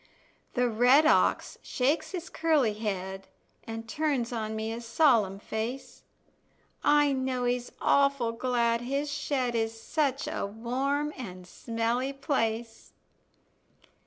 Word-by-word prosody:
The 245 0 +3
red 245 +6 +5
ox 315 - +2
shakes 275 +5 0
his 365 -2 -5
curly 310 -11 +2
head, 195 -3 -4 0.4
An' 225 0 -5
turns 255 -1 -1
on 220 -1 -3
me 220 +1 -3
a 235 - -6
solemn 230 -5 +3
face; 220 +6 -5 0.8
I 295 -1 +4
know 260 -2 -1
he's 245 0 -1
awful 275 -4 +3
glad 235 -1 +1
his 280 +4 -2
shed 275 -4 -1
Is 225 -1 -1
such 280 0 -1
a - - -3
warm 265 +8 -2
and 185 -8 -8
smelly 230 +7 -2
place. 230 -5 -2
245 Hz, 120 wpm, -28 LUFS, 225-275 Hz, 0.8 s, red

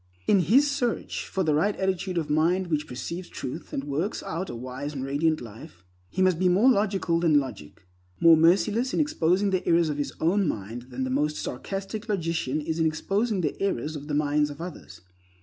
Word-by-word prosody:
In 200 - +4
his 230 - +4
search 275 -5 -2
for 190 - -1
the 155 -3 +2
right 195 +8 +2
attitude 190 -1 -1
of 160 -3 -1
mind 170 +4 +1
which 150 -1 0
perceives 170 +8 -6
truth, 130 - -7
and 135 - -3
works 145 +8 -2
out 175 +4 -4
a - - -5
wise 130 +4 -6
and 130 - -3
radiant 155 +3 +1
life, 105 -6 -12 0.2
he 190 - 0
must 185 -3 +3
be 185 -1 +3
more 210 +9 +5
logical 195 -6 +1
than 160 -4 +4
logic, 110 - -8 0.3
more 165 -1 +8
merciless 195 +10 +3
in - - +1
exposing 200 - +2
the 185 -1 0
errors 170 -1 +4
of 145 -1 -3
his 145 - -2
own 185 +4 +2
mind 115 +1 -5
than 130 +1 -4
the 130 - -2
most 150 +3 0
sarcastic 195 - -5
logician 165 -7 -1
is 160 +2 -3
in 160 - +3
exposing 195 +6 0
the 150 - -3
errors 155 -6 -1
of 145 0 -7
the 150 - -2
minds 150 0 +2
of 145 - -9
others. 165 - -9
165 Hz, 200 wpm, -26 LUFS, 145-190 Hz, 0.3 s, more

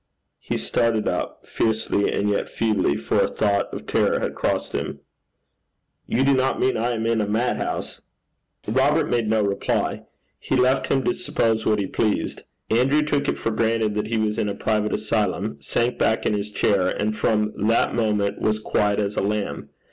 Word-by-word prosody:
He - - -3
started 115 -2 0
up - - -3
fiercely 110 -2 0
and 100 - 0
yet 105 - 0
feebly, 105 -9 +1
for 70 0 -1
a - - +3
thought 100 -1 0
of - - -7
terror - - +1
had - - -2
crossed - - -1
him. - - -3 1.1
'You 130 - +1
do 140 0 +4
not 130 0 +1
mean 130 - +2
I 120 +2 0
am 115 -1 -2
in 115 -1 +1
a 105 - -1
madhouse?' 110 +4 -2 0.7
Robert 135 +8 +2
made 115 -3 +1
no 110 -1 +2
reply. 100 -1 -1 0.4
He - - -1
left 130 +1 +2
him 135 -1 +1
to 185 - +1
suppose 115 -12 0
what 105 - +3
he 100 - -1
pleased. 105 +2 -1 0.3
Andrew 135 +6 +3
took 145 -1 0
it - - 0
for 115 - -2
granted 110 -1 +1
that 105 0 -2
he 115 0 -1
was 110 0 0
in 105 - 0
a 100 - -3
private 105 -1 0
asylum, 105 -9 -1
sank 120 - -1
back 110 - +1
in - - +2
his 105 0 -2
chair, 100 -2 +2
and 105 +3 -1
from 105 -1 +1
that 115 - +2
moment 105 -3 0
was 110 0 +1
quiet 105 -1 0
as 105 0 -1
a - - 0
lamb. 105 +1 -2
110 Hz, 185 wpm, -23 LUFS, 105-115 Hz, 1.1 s, do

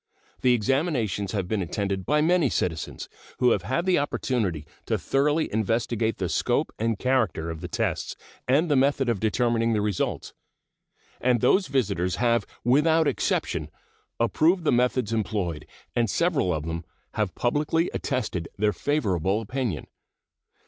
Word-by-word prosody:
The 125 -1 +4
examinations 115 - 0
have 100 -4 -1
been 105 0 -1
attended 95 +1 -2
by 150 +1 +3
many 165 -3 +3
citizens, 80 -7 -3 0.3
who 125 -1 +4
have 100 - +2
had 130 - -2
an 185 - +4
opportunity 110 - -1 0.2
to - - +1
thoroughly 150 +2 +1
investigate 115 +1 0
the 95 - -1
scope - - 0
and 115 -1 0
character 105 - 0
of 80 0 -7
the 90 - -4
tests 110 -3 -2 0.3
and 145 +7 +3
the 145 - +2
method 135 -1 +2
of 115 -4 0
determining 115 +1 +1
the 110 - +1
results, 105 -3 -2 0.9
and 125 -1 +2
those 185 - +3
visitors 100 -9 0
have 120 -3 +1 0.2
without 155 +6 +4
exception - - -1 0.5
approved 160 - +2
the - - +2
methods 125 -2 +1
employed, 95 -7 -2 0.3
and 120 -2 +2
several 155 - +1
of 80 -2 -2
them 80 0 -4 0.3
have 105 -3 -1
publicly 150 +7 +1
attested 110 - -2
their 105 +1 +2
favorable 95 - 0
opinion. 115 - -3
115 Hz, 145 wpm, -26 LUFS, 100-135 Hz, 0.9 s, The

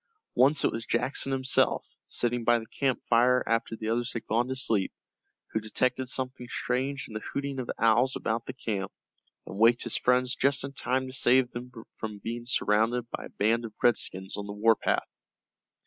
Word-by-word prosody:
Once 135 +5 +4
it - - +3
was 115 - -4
Jackson 135 +4 0
himself, 130 0 +2 0.2
sitting 120 0 0
by 120 +1 +4
the 115 - -6
camp 130 +3 -1
fire 125 +2 +4
after 115 0 0
the 110 0 -6
others 120 +1 -1
had 115 - -5
gone 120 +3 +1
to 130 - -3
sleep, 110 -7 +1 0.6
who 110 - 0
detected 125 +4 0
something 130 -1 -3
strange 135 +2 -2
in - - -12
the 110 - -3
hooting 140 +3 -4
of 125 - -5
owls 120 +3 +3
about 115 +1 -2
the 130 - -4
camp, 105 -6 -3 0.5
and 95 - -8
waked 115 +2 +5
his 120 - +1
friends 125 0 +2
just 140 +1 +1
in 135 0 -6
time 130 0 0
to 130 - -8
save 130 -1 +3
them 125 +1 -7 0.3
from 110 -2 -5
being 115 +3 -6
surrounded 115 0 +2
by - - -5
a - - -10
band 115 +3 +2
of 110 -2 -8
redskins 95 -5 +1
on 100 0 -5
the 100 - -5
war 110 +2 +4
path. - - 0
120 Hz, 195 wpm, -28 LUFS, 115-130 Hz, 0.6 s, waked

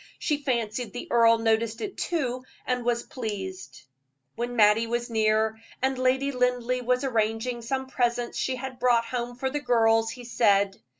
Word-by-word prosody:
She 300 - 0
fancied 235 -4 -2
the 245 - -6
earl 230 -1 +5
noticed 225 0 +1
it 395 - -5
too, 255 -7 -2 0.2
and 250 -1 -1
was 235 0 0
pleased. 190 - -6 0.5
When 240 +1 -3
Mattie 220 +1 +4
was 240 +1 -2
near, 220 0 +2 0.2
and 265 +1 +1
Lady 265 +2 +2
Linleigh 250 -1 0
was 250 +2 +1
arranging 230 0 -1
some 265 +3 -2
presents 240 -2 -1
she 260 - -1
had 260 0 -7
brought 240 -2 +3
home 245 0 -4
for 265 +1 -2
the 295 - -1
girls, 225 -3 +3
he 245 +1 -8
said. 200 -4 +2
240 Hz, 165 wpm, -26 LUFS, 225-255 Hz, 0.5 s, earl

